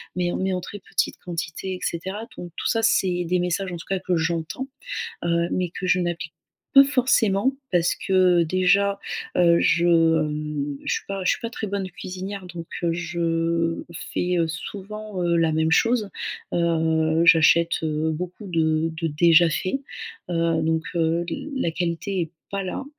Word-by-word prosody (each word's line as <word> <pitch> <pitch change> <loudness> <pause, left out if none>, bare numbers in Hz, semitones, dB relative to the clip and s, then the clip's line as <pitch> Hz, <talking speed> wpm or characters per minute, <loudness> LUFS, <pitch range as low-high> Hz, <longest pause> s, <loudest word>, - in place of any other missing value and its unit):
mais 175 -1 0
en - - -2
mais 190 0 0
en 180 - -2
très 205 +4 -8
petite - - -1
quantité 175 +2 -4
et - - -9
cetera. 190 +7 -4
Donc 175 -1 -7
tout - - -2
ça, 225 - +1
c'est 180 -5 +2
des 180 +1 +1
messages, 180 +1 -1
en 175 - -4
tout 165 - -10
cas, 190 -1 0
que 185 -1 -1
j'entends. 165 +9 -2 0.6
Heu, 170 0 +1
mais 180 -2 -1
que 185 - -5
je 185 0 +3
n'applique 170 -2 -3 0.4
pas 275 0 +10
forcément. 255 -3 +2 0.2
Parce 175 -1 +3
que 185 -2 +3
déjà, 190 +3 +2 0.4
heu, 170 -1 +5
je, 170 +1 +3
hem, 150 -3 +1
je - - -1
suis - - -4
pas 195 -1 -3
je - - +4
suis - - 0
pas 230 - -3
très 220 -2 -4
bonne 195 -1 -3
cuisinière 185 +3 -6
donc, 170 -2 -8 0.2
heu, 170 -1 +1
je 165 -1 -1 0.3
fais, 180 0 0
heu, 165 - +2
souvent, 200 +4 -6
heu, 170 -1 +2
la 165 -1 +2
même 160 +1 +1
chose. 230 +1 +2 0.4
Heu, 160 -1 +2
j'achète, 165 0 +5
heu, 155 0 0
beaucoup 180 +5 -6
de 160 -2 +1
de 165 - 0
déjà 165 +2 +5
fait. 185 - -1 0.5
Heu, 165 -1 +1
donc, 160 0 0
heu, 165 +1 +1 0.3
la 170 -10 0
qualité 175 +2 -2
est 160 - -5 0.2
pas 200 0 -2
là. 190 +8 -4
175 Hz, 175 wpm, -24 LUFS, 165-190 Hz, 0.6 s, pas